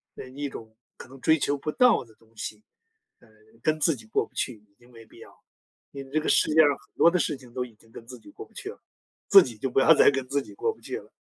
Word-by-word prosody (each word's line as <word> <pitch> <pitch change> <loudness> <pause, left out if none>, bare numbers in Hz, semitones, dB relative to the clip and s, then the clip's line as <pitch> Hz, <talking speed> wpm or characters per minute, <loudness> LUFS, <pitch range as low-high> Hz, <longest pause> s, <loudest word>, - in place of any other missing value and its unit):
呃， - - -9
一 140 +2 -5
种 110 -4 -11 0.2
可 - - -11
能 135 0 -15
追 160 0 +3
求 145 0 -1
不 150 +2 -4
到 250 - +3
的 110 -2 -21
东 115 0 -28
西， 105 0 -7 0.6
呃 120 - -23 0.3
跟 155 +3 0
自 155 0 +2
己 115 - -15
过 - - 0
不 - - -30
去， 125 - -3
已 105 -1 -26
经 120 - -22
没 115 -1 -15
必 110 - -19
要。 - - -13 0.6
因 140 -1 -8
为 135 - -17
这 155 - +1
个 155 - -5
世 - - +3
界 160 +1 +6
上 150 - +5
很 - - -26
多 170 - +5
的 180 - +1
事 150 -4 -1
情 125 -2 -17
都 125 - -2
已 120 -3 -12
经 110 +1 -24
跟 115 - -11
自 125 0 -10
己 305 - -17
过 425 +6 -10
不 - - -20
去 485 -5 -7
了， - - -12 0.5
自 195 -2 +8
己 120 - -8
就 135 - -2
不 130 - +1
要 160 +5 +6
再 - - +6
跟 135 -2 -3
自 140 +2 -1
己 - - -14
过 450 +2 -1
不 - - -24
去 - - -6
了。 - - -13
135 Hz, 315 characters per minute, -26 LUFS, 115-155 Hz, 0.6 s, 自